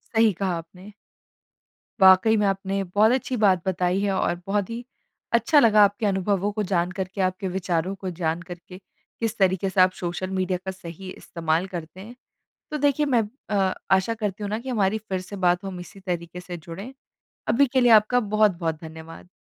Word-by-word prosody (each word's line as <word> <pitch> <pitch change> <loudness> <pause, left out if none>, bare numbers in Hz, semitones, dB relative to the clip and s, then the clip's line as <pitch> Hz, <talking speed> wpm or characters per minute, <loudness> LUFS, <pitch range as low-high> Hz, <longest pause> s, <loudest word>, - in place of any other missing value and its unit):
सही 225 -1 +5
कहा 185 -3 0
आपने। 180 +5 -11 1.1
वाक़ई 190 +4 +6
में, 210 - +2
आपने 195 0 -1
बहुत 205 +5 +3
अच्छी 255 0 -1
बात 190 -5 +3
बताई 185 0 +1
है, 200 -1 +1
और 175 -2 -1
बहुत 200 -1 0
ही 230 +1 -5 0.5
अच्छा 235 +6 +4
लगा 215 -4 +6
आपके 205 +2 +1
अनुभवों 200 0 0
को 210 0 -2
जान 180 -2 0
कर 190 -1 -3
के, 190 +1 -5
आपके 185 +1 -1
विचारों 180 0 -2
को 190 -1 -5
जान 165 -1 -2
कर 175 0 -8
के, 180 - -10 0.4
किस 225 -1 -2
तरीके 190 -1 +2
से 190 0 +3
आप 185 0 +5
सोशल 175 +1 -3
मीडिया 185 -1 -1
का 190 - -2
सही 185 0 -10
इस्तेमाल 165 +1 -2
करते 175 -1 -8
हैं। 230 +5 -11 0.6
तो 305 - -1
देखिए 290 +1 +2
मैं 250 -5 +3 0.3
अ, 195 -2 +1 0.2
आशा 190 +4 +3
करती 210 -2 -4
हूँ 205 - -3
ना 215 +2 -2
कि 260 - -8
हमारी 215 -3 +1
फिर 190 -4 -4
से 195 +2 -9
बात 180 -1 +1
हो, - - -5
हम 185 -2 -7
इसी 175 +2 -11
तरीके 175 -2 -5
से 180 -1 -7
जुड़ें। 190 +9 -9 0.6
अभी 280 +4 +4
के 260 0 +1
लिए 245 -1 +4
आपका 220 +3 +5
बहुत-बहुत 200 -7 +1
धन्यवाद। 160 +1 -11
190 Hz, 200 wpm, -24 LUFS, 180-215 Hz, 1.1 s, वाक़ई